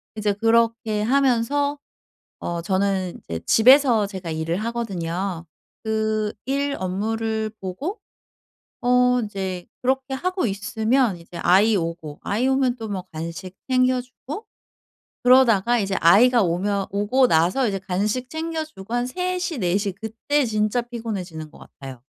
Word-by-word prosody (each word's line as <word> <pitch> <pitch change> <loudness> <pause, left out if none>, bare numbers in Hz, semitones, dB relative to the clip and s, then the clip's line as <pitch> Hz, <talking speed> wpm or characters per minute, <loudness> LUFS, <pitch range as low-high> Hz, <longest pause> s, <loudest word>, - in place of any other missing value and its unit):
이제 210 -1 0
그렇게 225 0 +1
하면서 280 +3 +1 0.6
어 170 -1 -3
저는 190 -1 -1
이제 85 0 -4
집에서 245 -2 +6
제가 190 -4 -6
일을 160 +2 -2
하거든요. 190 -6 -3 0.4
그 215 -1 0
일 280 +1 -1
업무를 220 +3 -2
보고 275 - -5 0.8
어 250 0 +4
이제 190 -3 -5 0.2
그렇게 265 +1 0
하고 365 0 -1
있으면 220 +3 0
이제 170 +1 -11
아이 200 +6 +4
오고 165 -3 -4
아이 225 +6 0
오면 265 -2 +2
또 225 -2 -6
뭐 195 -3 -3
간식 165 +3 -7
챙겨주고 255 - -1 0.8
그러다가 240 -3 +5
이제 195 -3 -1
아이가 230 +7 +6
오면 195 +3 0
오고 210 +6 +2
나서 180 +10 +2
이제 195 - -2
간식 205 +7 -2
챙겨주고 315 -9 -5
한 245 0 +1
3 365 +6 -2
시 355 -6 -3
4 180 -1 +1
시 200 -2 -2
그때 225 +8 -1
진짜 215 +2 0
피곤해지는 195 -10 -6
것 - - -16
같아요. 130 -3 -11
220 Hz, 270 characters per minute, -23 LUFS, 190-255 Hz, 0.8 s, 집에서